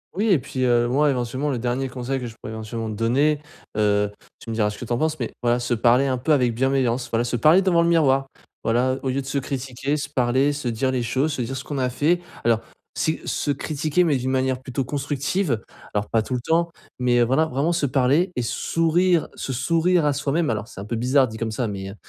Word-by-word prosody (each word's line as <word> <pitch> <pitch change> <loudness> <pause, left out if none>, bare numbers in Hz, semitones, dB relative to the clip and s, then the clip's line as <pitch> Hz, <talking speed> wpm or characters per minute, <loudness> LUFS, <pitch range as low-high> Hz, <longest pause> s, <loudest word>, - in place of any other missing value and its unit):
Oui 210 +4 +1
et 190 -6 +5
puis 130 -1 -4
heu, 120 -1 +3
moi, 145 +5 +3
éventuellement, 130 +2 -1
le 135 - -1
dernier 125 +3 -1
conseil 130 +2 -3
que 125 - -5
je 115 - -10
pourrais, 110 - -9
éventuellement, 110 +1 -5
te 110 - -4
donner, 135 +8 +2 0.4
heu, 105 -1 +2 0.3
tu 115 - -7
me - - -3
diras 105 -2 +2
ce 105 - -7
que - - -6
tu 120 - -2
en - - +1
penses, 155 -1 0
mais 120 - -3
voilà 120 0 +2
se 120 0 -1
parler 120 +3 +4
un 130 -2 0
peu 150 +5 +2
avec 125 -5 +2
bienveillance, 130 0 0
voilà 115 +1 +1
se 120 0 -2
parler 155 - +5
devant 175 -3 +3
le 170 - +2
miroir. 135 -5 +3 0.4
Voilà, 120 +3 +2
heu, 130 - -4
au 135 - -2
lieu 135 +2 0
de - - -10
se 140 +1 -1
critiquer, 135 +1 -3
se 145 -1 -3
parler, 130 +1 +2
se 145 -3 -4
dire 120 +3 0
les 130 -1 0
choses, 135 +6 0
se 130 - -3
dire 130 +3 -3
ce 130 - -6
qu'on 145 -2 -4
a 130 -1 +1
fait. 155 +7 +1 0.2
Alors, 115 -1 +3 0.3
c'est 160 - -1
se - - -2
critiquer 155 +4 0
mais 160 -5 +2
d'une 130 +1 -2
manière 130 -1 0
plutôt 130 0 -3
constructive, 145 - -1 0.3
alors 105 0 0
pas 115 - +3
tout 125 +4 -3
le 125 - -2
temps, 170 +5 +1 0.3
mais 125 -1 +2
heu, - - +6
voilà, 130 +7 +2
vraiment 145 +5 0
se 160 -4 +1
parler 140 +8 +2
et 125 - -1
sourire, 165 +6 +1
se - - -5
sourire 165 +6 +2
à 145 - +3
soi-même. 145 +2 0
Alors, 110 -1 -3
c'est 125 - -11
un 100 - -6
peu 115 - -3
bizarre 130 +3 +3
dit 110 -1 -8
comme 115 - -1
ça 115 +2 -1
mais 95 -2 -5
heu 100 - -9
130 Hz, 255 wpm, -23 LUFS, 120-145 Hz, 0.4 s, heu